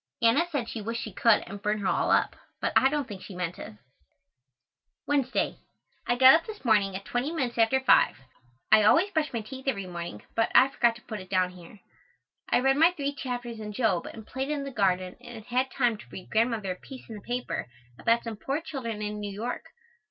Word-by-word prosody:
Anna 235 +9 +4
said 270 -7 -2
she 225 - -5
wished 230 +3 -3
she 215 - -7
could 225 +2 +4
and 200 +2 -8
burn 210 0 0
her 200 - -5
all - - +1
up, - - +3 0.2
but - - -1
I 265 - +6
don't 290 -2 -2
think 200 -5 -8
she 190 - -10
meant 180 -1 -4
it. - - -8 1.3
Wednesday. 275 -3 0 0.5
I 240 - +2
got 260 +1 +9
up 330 +1 +2
this 430 -8 -9
morning 205 -4 +3
at 195 - -6
twenty 250 +5 -1
minutes 255 -8 -2
after 230 +4 +4
five. 265 - +4 0.5
I 215 - +8
always 335 - +4
brush 315 -3 0
my 230 - -2
teeth 265 +5 -10
every 200 -8 -1
morning, 170 - -7
but 225 0 +2
I 265 - +7
forget 235 -4 +2
to 240 - -15
put 215 -2 -6
it 185 -1 -11
down 185 -1 +1
here. 180 +3 -14 0.7
I - - +3
read 270 +1 +3
my 325 +3 +7
three 285 -4 -2
chapters 245 -4 -5
in 210 -1 -6
Job 205 -6 +1
and 220 -1 -9
played 265 +4 -4
in 295 -2 -1
the 275 - -5
garden 185 -5 0
and 235 -3 -10
had 255 +2 0
time 245 -5 +1
to - - -12
read 185 - -10
Grandmother 220 -3 +1
a - - -3
piece 260 +5 -12
in 225 - -8
the 210 - -8
paper 245 - -3 0.3
about 230 0 +2
some 230 -2 -5
poor 275 +7 -2
children 235 -9 -5
in 210 0 -4
New 205 -1 -4
York. 225 +5 -4
230 Hz, 220 wpm, -28 LUFS, 205-265 Hz, 1.3 s, got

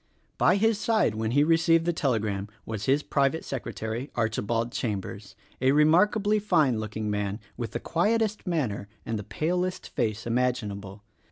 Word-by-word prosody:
By 180 - +5
his 220 +1 +2
side 215 - +2
when 110 +1 -2
he 145 +5 +4
received 165 +1 +3
the 175 - +1
telegram 110 -9 -1 0.2
was 110 -2 -4
his 140 +2 +2
pri 140 -1 +2
vate 160 +3 -6
secretary 120 0 -4
Archibald 115 +1 -1
Chambers, 105 -3 -4 0.3
a 130 +1 +4
remarkably 200 +8 +4
fine 155 - +2
looking 110 0 -3
man 105 0 -2 0.2
with 115 -4 -5
the - - -2
quietest 215 +4 0
manner 125 - -1 0.2
and 115 -2 -2
the - - -5
palest 180 - -2
face 110 -2 -2
imaginable. 105 -5 -2
125 Hz, 155 wpm, -27 LUFS, 110-170 Hz, 0.3 s, By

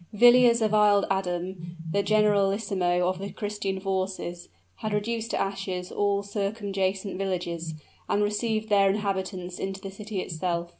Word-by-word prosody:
Villiers 240 +1 +6
of 215 -1 +1
Isle 205 -1 +5
Adam, 175 -2 -3
the 200 - +2
generalissimo 200 -4 +2
of 185 0 -1
the 200 +1 -4
Christian 205 -2 -3
forces, 185 -2 -3 0.3
had 215 -1 -3
reduced 225 +2 -1
to - - -1
ashes 190 -2 -3
all 200 -1 +1
circumjacent 200 -2 -2
villages, 170 -4 -3 0.3
and 205 - +2
received 215 +1 -1
their 200 -1 +5
inhabitants 190 -3 -2
into 195 0 -3
the 195 0 -7
city 210 0 -5
itself. 170 0 -2
195 Hz, 140 wpm, -27 LUFS, 185-210 Hz, 0.3 s, Villiers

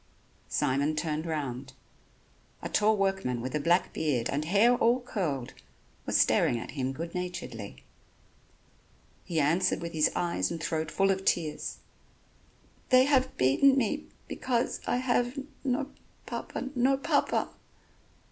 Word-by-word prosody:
Simon 140 +4 +1
turned 155 0 -2
round. 135 -5 -4 0.9
A - - -3
tall 215 +1 +3
workman 195 -11 0
with 125 +2 -5
a 150 - 0
black 175 +4 +2
beard 135 -7 0
and 145 +2 -1
hair 205 +8 +4
all 240 +1 +3
curled, 170 - -3 0.5
was - - +2
staring 120 - +3
at 115 - -6
him 135 -2 -2
good 165 +5 -6
naturedly. 115 - -6 1.4
He 165 -2 -1
answered 165 +6 +2
with 170 0 -6
his 155 -1 +3
eyes 170 - 0
and 165 - -4
throat 160 -1 -2
full 195 +4 +2
of 190 0 -2
tears: 160 -5 -1 1.1
"They 255 -1 +7
have 265 -2 +2
beaten 140 - +4
me... 270 +5 0 0.2
because... 245 -2 -1
I... - - +1
have 245 +1 0 0.3
no... 270 +1 -1 0.3
Papa... 265 - -5
no 265 +1 +3
Papa." 275 - 0
170 Hz, 135 wpm, -29 LUFS, 145-245 Hz, 1.4 s, They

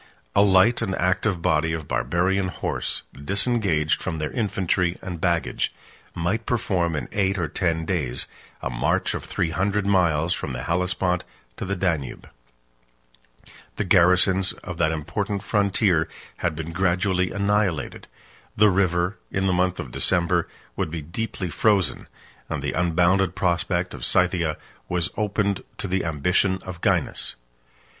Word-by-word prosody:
A - - +6
light 100 +4 +5
and 95 -4 -1
active 90 0 0
body 80 +1 +2
of 80 -3 -4
Barbarian 85 +10 +1
horse, 90 - -3
disengaged 95 - +1
from 85 -4 -3
their 75 -1 -3
infantry 95 -5 0
and 90 -3 -6
baggage, 85 -2 0 0.4
might 100 +8 -1
perform 90 -8 0
in 75 - -3
eight 100 -1 +1
or 85 -3 0
ten 80 0 -1
days 70 -9 -1 0.4
a 60 - -2
march - - 0
of - - -4
three 80 - -1
hundred 100 +3 0
miles 85 -4 +2
from - - -4
the - - -4
Hellespont 90 +1 0 0.3
to - - -4
the 100 +1 -1
Danube; 85 -8 -2 1.2
38 - - -20 0.2
the - - -1
garrisons 95 +1 +4
of 90 -3 -6
that 80 - +3
important 90 +6 -3
frontier 100 -5 +2 0.3
had 85 -2 -1
been 80 +1 -5
gradually 90 +1 +1
annihilated; 100 -6 0 0.5
the 105 0 +6
river, 90 0 +1
in 95 0 -1
the 95 - +2
month 90 0 +1
of - - -5
December, 85 -1 +2 0.3
would - - -1
be 80 -1 -5
deeply 95 +1 -4
frozen; 100 -2 +2 0.4
and 75 -3 -3
the 75 - -1
unbounded 90 +2 +2
prospect 90 0 0
of - - -8
Scythia 90 -4 +2 0.3
was 90 -1 0
opened 105 -2 0
to - - -3
the 95 +1 0
ambition 90 +5 +1
of 90 -2 -8
Gainas. - - 0
90 Hz, 145 wpm, -24 LUFS, 85-95 Hz, 1.2 s, A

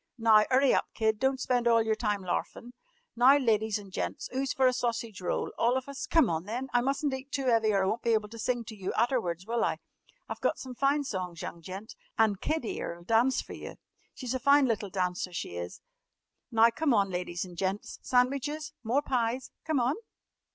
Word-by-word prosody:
Now, 220 -2 +6
'urry 265 +1 +4
up, - - +1
Kid. 220 -1 +1
Don't 265 +1 +1
spend 245 -2 +1
all 230 -1 +5
yer 220 0 +1
time 210 -3 -1
larfin'. 235 +6 -4 0.4
Now, 255 +4 +7
ladies 220 -5 +1
an' 200 -2 -11
gents, - - -4
'oo's 265 0 -1
fer 265 - +2
a 255 - +5
sausage 230 -5 -2
roll? 180 - -1
All 240 +3 +3
of 260 - -5
us? 280 -1 -5
Come 325 - +4
on, 165 0 -2
then! 245 +6 -4
I 245 - +4
mustn't 275 +2 0
eat 265 +1 -6
too 270 -2 0
'eavy 225 -2 +3
or 195 -2 +2
I - - +1
won't 220 +5 -1
be 235 - +2
able 215 -1 -1
to 230 +1 -10
sing 240 +1 -1
to 220 -1 -9
yer 195 -2 -4
aterwards, 215 -7 0
will 230 +1 0
I? - - 0 0.5
I've - - -6
got - - +1
some 260 -1 -7
fine 275 +3 +2
songs, 180 -8 -4
young 170 - -6
gent. 190 +6 -8 0.2
And 215 -3 +2
Kid 315 -5 -1
'ere 170 -5 -4
'll - - -14
dance 230 +7 +2
fer - - -10
yer. - - -8 0.4
She's 255 -2 -4
a 260 - -1
fine 280 +2 +5
little 215 -4 -1
dancer, 180 -1 -2
she 85 - -5
is! 85 0 -6 0.7
Now, 230 0 +5
come 280 0 +1
on, 195 -2 +2
ladies 180 0 -3
an' 180 -1 -11
gents, 190 +3 -3
sandwiches? 280 +4 0
More 250 +5 +1
pies? 250 -1 -1
Come 315 -4 +1
on!" 245 +3 +2
230 Hz, 215 wpm, -29 LUFS, 205-260 Hz, 0.7 s, Now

